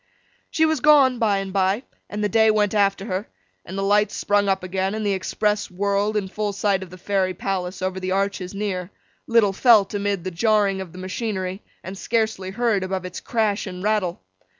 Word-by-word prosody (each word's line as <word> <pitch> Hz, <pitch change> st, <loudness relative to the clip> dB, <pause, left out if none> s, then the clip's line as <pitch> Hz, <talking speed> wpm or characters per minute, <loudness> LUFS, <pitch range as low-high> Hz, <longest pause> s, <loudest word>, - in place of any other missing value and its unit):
She 320 Hz, -, +2 dB
was 315 Hz, -2 st, +1 dB
gone 275 Hz, -4 st, +5 dB
by 210 Hz, -3 st, +2 dB
and 195 Hz, -1 st, -4 dB
by, 195 Hz, +4 st, +1 dB, 0.3 s
and 210 Hz, 0 st, -3 dB
the -, -, +3 dB
day 220 Hz, +2 st, +4 dB
went 210 Hz, -1 st, +2 dB
after 200 Hz, -2 st, +2 dB
her, 195 Hz, -1 st, -3 dB, 0.4 s
and 190 Hz, -, -8 dB
the 195 Hz, -, -1 dB
lights 205 Hz, +1 st, +2 dB
sprung 205 Hz, 0 st, +1 dB
up 190 Hz, -1 st, 0 dB
again, 190 Hz, +2 st, -1 dB
and 220 Hz, -1 st, -3 dB
the 205 Hz, -, +2 dB
Express 210 Hz, +2 st, -1 dB
whirled 200 Hz, +3 st, 0 dB
in 200 Hz, -2 st, -1 dB
full 210 Hz, +1 st, -3 dB
sight 200 Hz, -1 st, +1 dB
of 190 Hz, -, -8 dB
the 185 Hz, -, -11 dB
Fairy 185 Hz, 0 st, -1 dB
Palace 185 Hz, 0 st, -3 dB
over 185 Hz, 0 st, -2 dB
the 185 Hz, 0 st, -3 dB
arches 195 Hz, -1 st, -1 dB
near: 190 Hz, -3 st, -3 dB, 0.4 s
little 225 Hz, -4 st, +4 dB
felt 215 Hz, -2 st, +5 dB
amid 200 Hz, -3 st, -1 dB
the 185 Hz, -, -4 dB
jarring 200 Hz, +1 st, +2 dB
of 185 Hz, -3 st, -8 dB
the 180 Hz, -, -12 dB
machinery, 190 Hz, 0 st, -4 dB, 0.2 s
and 190 Hz, -, -7 dB
scarcely 220 Hz, -5 st, -1 dB
heard 220 Hz, 0 st, 0 dB
above 185 Hz, -1 st, -3 dB
its 180 Hz, 0 st, -6 dB
crash 215 Hz, -3 st, -1 dB
and 180 Hz, 0 st, -7 dB
rattle. 205 Hz, -, 0 dB
200 Hz, 200 wpm, -23 LUFS, 185-215 Hz, 0.4 s, gone